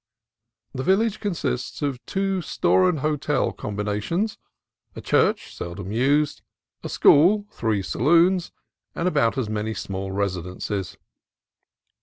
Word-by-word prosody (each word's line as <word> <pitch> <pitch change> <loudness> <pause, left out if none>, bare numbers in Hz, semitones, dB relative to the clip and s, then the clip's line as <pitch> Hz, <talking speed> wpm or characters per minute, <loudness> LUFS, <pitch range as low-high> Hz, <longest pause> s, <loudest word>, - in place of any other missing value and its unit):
The 130 - -3
village 200 +6 +2
con 205 -3 -2
sists 130 -3 -3
of 135 -4 -2
two 195 -1 -1
store 185 +2 +2
and 160 -6 -2
hotel 150 0 0
combinations, 105 - -2 0.6
a - - -6
church - - +1
seldom 90 +2 -6
used, 140 +6 +1 0.4
a - - -5
school, 195 +8 +5
three 110 -4 -1
saloons, 170 - +3 0.4
and 170 - -1
about 115 -8 +2
as 130 -5 -1
many 110 +1 -3
small 95 0 -4
residences. 95 0 -3
135 Hz, 120 wpm, -24 LUFS, -, 0.6 s, school